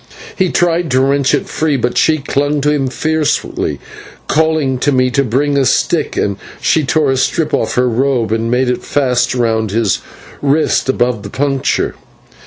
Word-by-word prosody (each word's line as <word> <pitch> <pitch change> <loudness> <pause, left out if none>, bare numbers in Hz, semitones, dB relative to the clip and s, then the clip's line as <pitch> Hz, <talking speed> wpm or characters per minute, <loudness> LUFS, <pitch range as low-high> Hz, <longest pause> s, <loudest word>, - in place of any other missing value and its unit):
He 185 -2 +1
tried 175 -1 +1
to 130 -1 +2
wrench 135 0 +2
it - - -3
free, 155 -3 0
but 120 0 -1
she 160 -1 +3
clung 145 +1 -1
to 150 +1 +2
him 140 -3 0
fiercely, 155 +3 -1
then, - - -10 0.5
calling 155 -4 +1
to 145 - +1
me 130 -1 +2
to 140 +3 +2
bring 140 +4 0
a - - +3
stick, - - 0 0.4
she 160 - +2
tore 145 0 +1
a 135 - 0
strip 155 +4 0
off - - 0
her 125 0 +2
robe 125 -1 0
and 115 +1 -1
made 125 +2 +1
it - - -3
fast 130 -3 0
round 110 -3 0
his 105 -1 0 0.4
wrist 145 -1 +1
above 125 -4 0
the 100 - -8
puncture. 135 +2 -1
135 Hz, 180 wpm, -15 LUFS, 125-150 Hz, 0.5 s, she